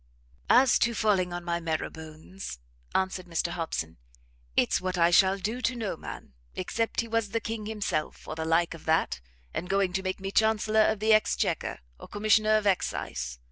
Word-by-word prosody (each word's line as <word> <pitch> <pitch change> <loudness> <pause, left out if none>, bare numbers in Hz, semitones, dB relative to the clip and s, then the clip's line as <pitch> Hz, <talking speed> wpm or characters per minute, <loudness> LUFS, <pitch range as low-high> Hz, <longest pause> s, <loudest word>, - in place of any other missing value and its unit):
"As 255 +1 +6
to 235 -1 +2
falling 195 -5 +2
on 175 0 -4
my 170 0 -1
marrowbones," 160 - -5 0.4
answered 190 -1 0
Mr 170 0 -1
Hobson, 160 - -4 0.6
"it's - - +3
what 185 0 -2
I 170 0 +4
shall 190 +2 +5
do 220 +6 -3
to 250 0 0
no 220 -7 -3
man, 70 - -9 0.2
except 225 +5 -1
he 230 - -7
was 225 -2 0
the 230 - -1
King 225 -1 -5
himself, 205 -8 -3
or - - -4
the 160 0 -4
like 165 +1 +2
of 165 - -12
that, 160 - +1 0.3
and 180 - -4
going 195 -2 +1
to 190 - 0
make 185 0 -3
me 195 0 -4
Chancellor 220 0 +3
of 215 -2 -1
the 220 0 +5
Exchequer, 215 - +1 0.2
or - - -10
Commissioner 215 +1 +3
of 215 - -2
Excise. 65 - -1
190 Hz, 180 wpm, -28 LUFS, 170-215 Hz, 0.6 s, As